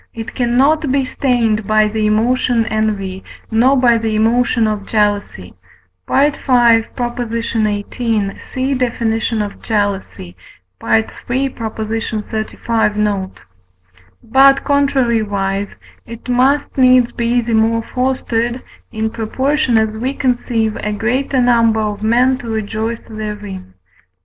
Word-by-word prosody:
it 225 Hz, 0 st, -6 dB
cannot 270 Hz, +4 st, +2 dB
be 275 Hz, 0 st, +1 dB
stained 230 Hz, -6 st, 0 dB
by 215 Hz, 0 st, +3 dB
the 215 Hz, 0 st, -1 dB
emotion 230 Hz, +2 st, +1 dB
envy, 205 Hz, -4 st, -2 dB, 0.3 s
nor 250 Hz, +5 st, +4 dB
by 240 Hz, -2 st, +4 dB
the 220 Hz, -1 st, -1 dB
emotion 230 Hz, +1 st, +2 dB
of 210 Hz, -2 st, -2 dB
jealousy 205 Hz, -, -1 dB, 0.6 s
(V. 285 Hz, +2 st, +3 dB
xviii. 230 Hz, -4 st, 0 dB, 0.6 s
see 265 Hz, +1 st, -2 dB
definition 230 Hz, -3 st, -1 dB
of 205 Hz, -, -8 dB
Jealousy, 200 Hz, -, -3 dB, 0.5 s
III. 110 Hz, -1 st, +3 dB, 0.5 s
xxxv. 220 Hz, -1 st, -3 dB
note); 205 Hz, -3 st, -2 dB, 0.8 s
but, 270 Hz, +3 st, +4 dB
contrariwise, 220 Hz, -8 st, 0 dB, 0.3 s
it 230 Hz, +1 st, -10 dB
must 265 Hz, +4 st, +1 dB
needs 255 Hz, -2 st, +5 dB
be 235 Hz, +1 st, 0 dB
the 235 Hz, -1 st, -2 dB
more 225 Hz, +1 st, +2 dB
fostered, 250 Hz, -1 st, -2 dB, 0.3 s
in 220 Hz, -1 st, -2 dB
proportion 260 Hz, +3 st, 0 dB
as 220 Hz, -1 st, +1 dB
we 255 Hz, +5 st, -3 dB
conceive 240 Hz, -4 st, 0 dB
a 210 Hz, -, -3 dB
greater 255 Hz, +5 st, 0 dB
number 230 Hz, -3 st, +3 dB
of 210 Hz, -1 st, -3 dB
men 250 Hz, +4 st, +2 dB
to 235 Hz, -, -7 dB
rejoice 220 Hz, +1 st, -3 dB
therein. 210 Hz, -, -7 dB
225 Hz, 110 wpm, -16 LUFS, 215-250 Hz, 0.8 s, needs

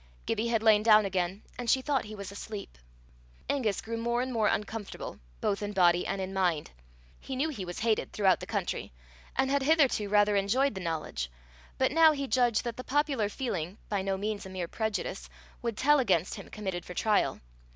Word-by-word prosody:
Gibbie 225 Hz, +2 st, 0 dB
had 225 Hz, -2 st, +1 dB
lain 215 Hz, -2 st, +6 dB
down 215 Hz, -1 st, +6 dB
again, 190 Hz, +1 st, -2 dB, 0.2 s
and 240 Hz, -1 st, -2 dB
she 260 Hz, +2 st, +3 dB
thought 275 Hz, -5 st, 0 dB
he 215 Hz, 0 st, -8 dB
was 200 Hz, -2 st, -7 dB
asleep. 200 Hz, -, -8 dB, 0.7 s
Angus 225 Hz, -8 st, 0 dB
grew 230 Hz, +1 st, -4 dB
more 235 Hz, +1 st, 0 dB
and 260 Hz, 0 st, -4 dB
more 220 Hz, -2 st, +2 dB
uncomfortable, 210 Hz, 0 st, -3 dB, 0.2 s
both 200 Hz, -, 0 dB
in 205 Hz, 0 st, -3 dB
body 175 Hz, -2 st, +4 dB
and 195 Hz, -, -2 dB
in 190 Hz, 0 st, -4 dB
mind. 175 Hz, -, 0 dB, 0.5 s
He 265 Hz, -, -6 dB
knew 285 Hz, +5 st, 0 dB
he 210 Hz, -11 st, -5 dB
was 175 Hz, 0 st, -6 dB
hated 220 Hz, -1 st, 0 dB
throughout 195 Hz, -3 st, +3 dB
the -, -, -8 dB
country, -, -, -3 dB, 0.4 s
and 265 Hz, -, +1 dB
had 280 Hz, 0 st, +2 dB
hitherto 270 Hz, -8 st, +3 dB
rather 205 Hz, 0 st, +4 dB
enjoyed 225 Hz, +8 st, +2 dB
the 190 Hz, -, -6 dB
knowledge; 155 Hz, -, -3 dB, 0.5 s
but -, -, +2 dB
now 320 Hz, +1 st, +6 dB
he 280 Hz, -1 st, -2 dB
judged 245 Hz, -4 st, +2 dB
that 235 Hz, -2 st, -4 dB
the 255 Hz, -, -5 dB
popular 275 Hz, -7 st, +1 dB
feeling, 195 Hz, -6 st, -3 dB
by 205 Hz, -2 st, 0 dB
no 195 Hz, 0 st, -1 dB
means 210 Hz, +1 st, -3 dB
a 190 Hz, -, -8 dB
mere 185 Hz, -2 st, -4 dB
prejudice, 200 Hz, -, -3 dB, 0.3 s
would 230 Hz, -3 st, -3 dB
tell 295 Hz, +4 st, +5 dB
against 190 Hz, -8 st, +2 dB
him -, -, -8 dB
committed 190 Hz, -5 st, -4 dB
for 180 Hz, -, -9 dB
trial. 215 Hz, -2 st, +2 dB
210 Hz, 200 wpm, -30 LUFS, 190-245 Hz, 0.7 s, lain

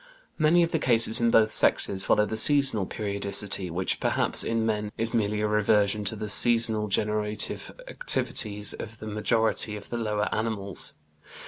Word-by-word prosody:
Many 165 Hz, +3 st, +4 dB
of 170 Hz, -, -2 dB
the -, -, 0 dB
cases 115 Hz, -2 st, +3 dB
in 115 Hz, -, +3 dB
both 110 Hz, -1 st, +3 dB
sexes 95 Hz, -1 st, +1 dB
follow 105 Hz, -, +2 dB
the 110 Hz, -, -5 dB
seasonal 135 Hz, -4 st, +1 dB
periodicity 100 Hz, -2 st, -3 dB
which 90 Hz, +3 st, -2 dB
perhaps -, -, +2 dB
in 115 Hz, -1 st, -1 dB
man 105 Hz, -1 st, -2 dB
is 115 Hz, +1 st, -2 dB
merely 105 Hz, -2 st, -1 dB
a 105 Hz, -, 0 dB
reversion 105 Hz, 0 st, +1 dB
to 105 Hz, -, -1 dB
the 105 Hz, 0 st, -6 dB
seasonal 115 Hz, -1 st, +3 dB
generative 105 Hz, +1 st, -2 dB, 0.2 s
activities 105 Hz, -, 0 dB
of 110 Hz, 0 st, -9 dB
the 110 Hz, -, -10 dB
majority 110 Hz, 0 st, 0 dB
of 105 Hz, -, -11 dB
the 120 Hz, -, -3 dB
lower 105 Hz, -2 st, -2 dB
animals." 110 Hz, -4 st, -2 dB
105 Hz, 160 wpm, -26 LUFS, 105-115 Hz, 0.2 s, Many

